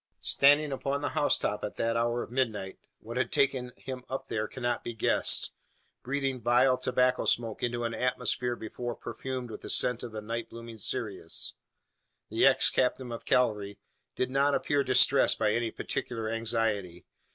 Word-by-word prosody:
Standing 145 +1 +4
upon 140 +1 -2
the 145 - 0
housetop 105 -7 +1
at 105 - -4
the 115 0 0
hour 120 +1 +1
of - - -11
midnight 110 -7 -1 0.2
what 115 +2 -6
had 130 - 0
taken 130 -2 +1
him 130 -1 -7
up 135 0 -5
there 110 -1 -1
cannot 120 -2 -2
be 120 - -5
guessed - - +2 0.5
breathing 135 -1 -2
vile 125 +3 +4
tobacco 125 0 +1
smoke 115 -2 +1
into 120 0 -1
an 115 0 -2
atmosphere 125 0 0
before 120 +2 -5
perfumed 125 +1 -5
with - - -8
the - - -8
scent 125 -1 +1
of 120 - -6
the 110 - -5
night 115 +2 -4
blooming 115 -1 -9
cereus; - - -3 0.8
the - - +5
ex - - +4
captain 125 -1 0
of 115 - -6
cavalry 105 -5 +1 0.4
did 130 - -1
not 140 +1 +3
appear 145 -1 +1
distressed 130 +1 +4
by 110 -1 +2
any 120 +1 0
particular 115 0 -4
anxiety. 110 -6 -1
120 Hz, 165 wpm, -29 LUFS, 115-130 Hz, 0.8 s, the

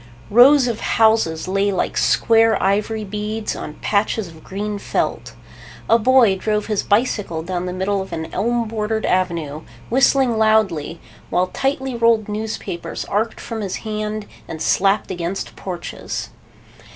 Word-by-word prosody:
Rows 255 +4 +7
of 230 -2 -2
houses 220 -8 +2
lay 195 +2 +1
like 185 - -1
square 225 -1 +3
ivory 210 +3 0
beads 210 +2 -4
on 150 - -7
patches 210 0 0
of 160 -2 -14
green 205 +1 -4
felt. - - -2 0.5
A 230 - +5
boy 240 -4 +5
drove 210 +2 -1
his 210 -2 0
bicycle 205 -7 0
down 180 +1 -3
the - - -3
middle 190 +2 -1
of 190 - -8
an 160 0 -5
elm 235 +1 0
bordered 220 0 -2
avenue, 170 -5 -1 0.3
whistling 260 -2 +3
loudly, 195 -8 +2 0.3
while 180 +1 +1
tightly 270 -1 -1
rolled 230 -2 +2
newspapers 210 -5 -4
arced 215 +3 -1
from 225 -2 -5
his 195 -3 -3
hand 215 0 -3 0.2
and 160 - -6
slapped 195 +5 +2
against 175 +1 -4
porches. 180 -3 -6
210 Hz, 140 wpm, -20 LUFS, 185-225 Hz, 0.5 s, Rows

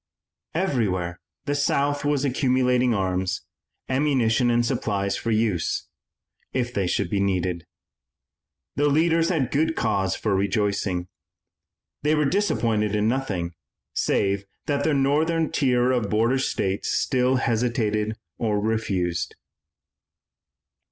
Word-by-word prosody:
Everywhere 100 - 0 0.3
the 145 - 0
South 145 0 +1
was 145 -1 +1
accumulating 125 -2 +2
arms, 95 -3 -1 0.4
ammunition 130 -3 +2
and 120 0 +2
supplies 100 -6 -1
for 115 - -3
use 110 -6 0 0.7
if 125 -1 -1
they 100 -5 0
should - - 0
be 100 - -1
needed. 90 -3 -1 1.1
The 145 +1 +3
leaders 165 +3 +3
had 155 -8 0
good 160 +3 +1
cause 100 -5 0
for 105 -3 0
rejoicing. 100 -2 0 0.9
They 150 +2 +2
were 150 -1 +2
disappointed 115 - +1
in 105 +1 +2
nothing, 100 -9 -1 0.4
save 100 0 0 0.2
that 145 +1 0
northern 155 +3 +2
tier 125 -3 +2
of 120 -5 0
border 115 +5 +2
states 95 -6 -1
which - - +1
still 130 -1 +2
hesitated 110 -3 0 0.2
or 105 -3 +1
refused. 95 -6 -1
115 Hz, 115 wpm, -24 LUFS, 100-140 Hz, 1.1 s, The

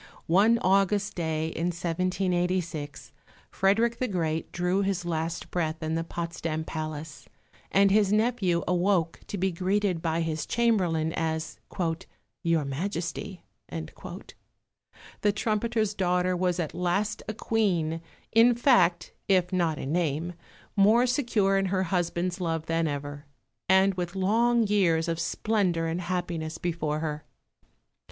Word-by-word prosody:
One 205 +7 +4
August 195 +2 +2
day 160 -2 -1
in 165 +1 -2
1786 175 -3 -1 0.4
Frederick 225 +5 +2
the 255 - 0
Great 165 -5 -2
drew 180 +3 0
his 195 -3 -1
last 165 0 -3
breath 160 -2 -2
in 155 0 -1
the 165 0 0
Potsdam 165 -1 -4
Palace, 155 -1 -6 0.4
and 195 0 +5
his 205 -1 +4
nephew 215 -6 +2
awoke 180 -2 +1
to 205 - -4
be 190 +1 +1
greeted 185 0 0
by 165 0 0
his 160 -1 -2
chamberlain 180 -9 +1
as 160 -2 -2 0.8
"Your 165 -3 +1
Majesty." 175 +5 -4 0.3
The 205 - -7
trumpeter's 215 0 0
daughter 180 -1 +1
was 180 0 0
at 160 -3 -2
last 195 +4 -1
a 215 - -4
Queen, 175 -9 0 0.3
in 230 +2 +6
fact, 185 -9 +3
if 185 -2 +2
not 170 -4 +1
in 135 - -4
name, 165 0 0 0.4
more 220 +5 +5
secure 230 -7 +2
in 195 - 0
her 185 0 +1
husband's 175 0 -1
love 165 -2 -1
than 165 0 0
ever, 145 0 -5 0.4
and 190 +1 +5
with 175 0 -4
long 230 +5 +3
years 180 -6 +2
of 165 -1 -1
splendour 180 -1 0
and 165 +2 -2
happiness 170 -3 -3
before 160 -3 -2
her. 150 -2 -3
180 Hz, 130 wpm, -27 LUFS, 165-195 Hz, 0.8 s, in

